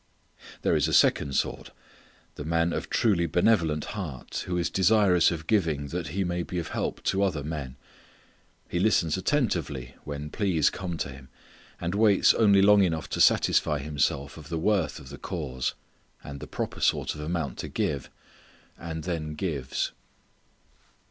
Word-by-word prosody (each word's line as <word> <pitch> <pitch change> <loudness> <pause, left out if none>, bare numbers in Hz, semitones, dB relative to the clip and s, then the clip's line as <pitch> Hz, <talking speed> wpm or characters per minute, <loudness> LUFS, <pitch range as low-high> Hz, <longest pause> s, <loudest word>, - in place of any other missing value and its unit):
There - - +3
is 75 0 +2
a 80 - +1
second 70 -2 +3
sort: - - -1 0.6
the - - -7
man 85 +2 +1
of - - -4
truly 95 -7 +2
benevolent 85 -3 +2
heart 80 - -5
who 90 -1 -1
is 85 - -1
desirous 95 -2 +4
of 80 -2 -4
giving 80 -8 0
that 85 0 -3
he 95 +7 -1
may 90 -1 -1
be 90 +1 -5
of 85 - -3
help - - -3
to 95 - +1
other 90 -8 0
men. 70 -4 -5 0.9
He 85 - -2
listens 90 -6 +2
attentively 85 - -1
when 75 0 -6
pleas 90 -7 +2
come 90 -3 -5
to - - -3
him, 65 -1 -12 0.5
and 85 +1 -2
waits 105 -1 +5
only 100 -3 +5
long 105 0 +6
enough 80 -5 0
to - - 0
satisfy 75 - +4
himself 70 -1 -1
of 75 -2 -11
the 85 - -2
worth 90 -1 +1
of 65 - -11
the 70 - -9
cause, 70 -9 -3 0.5
and 70 0 -8
the - - -8
proper - - -4
sort - - +1
of 75 - -8
amount 80 -1 -3
to - - -4
give, 70 -3 -2 0.7
and 80 -1 -5
then 75 -2 -3
gives. 75 -6 -2
80 Hz, 165 wpm, -27 LUFS, 75-95 Hz, 0.9 s, long